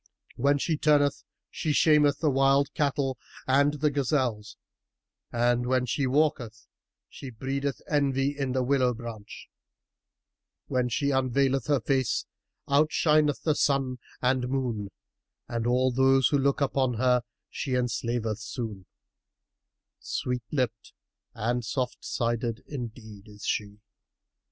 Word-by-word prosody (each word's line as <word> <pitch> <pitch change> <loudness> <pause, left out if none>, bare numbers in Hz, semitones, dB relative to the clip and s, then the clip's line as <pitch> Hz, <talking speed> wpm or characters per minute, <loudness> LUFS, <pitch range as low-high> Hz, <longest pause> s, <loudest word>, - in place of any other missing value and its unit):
When 140 +3 +2
she 155 +2 -1
turneth 145 -2 +3 0.3
she 155 - -1
shameth 150 -2 +4
the 155 -3 +3
wild 135 +1 +3
cattle[FN#322] 140 -2 0 0.3
and 140 +2 +4
the 150 0 +1
gazelles 125 -6 -1 0.7
and 120 +1 +1
when 130 0 +2
she 130 +3 0
walketh, 130 -6 0 0.4
she 135 - -9
breedeth 135 +3 -3
envy 140 -1 +1
in 135 -3 -2
the 130 -1 +1
willow 130 -2 +2
branch: 110 -3 -9 1.2
when 125 -2 0
she 140 +4 0
unveileth 135 0 +1
her 145 -2 +3
face 130 0 0 0.4
outshineth 150 +1 +3
sun 135 -4 +1 0.2
and 125 0 +1
moon 120 -7 -2 0.6
and 115 -1 -2
all 130 +1 +2
who 135 +1 +4
look 140 0 +2
upon 130 -2 +1
her 125 +1 +3 0.3
she 130 -2 -3
enslaveth 120 -3 -1
soon: 115 -4 -6 1.1
sweet 125 -1 -3
lipped 120 -6 -2 0.4
and 120 +2 -1
soft 125 +2 -3
sided 115 0 -2
indeed 110 -6 -8
is 105 -1 -11
she." 105 0 -2
130 Hz, 115 wpm, -27 LUFS, 120-140 Hz, 1.2 s, shameth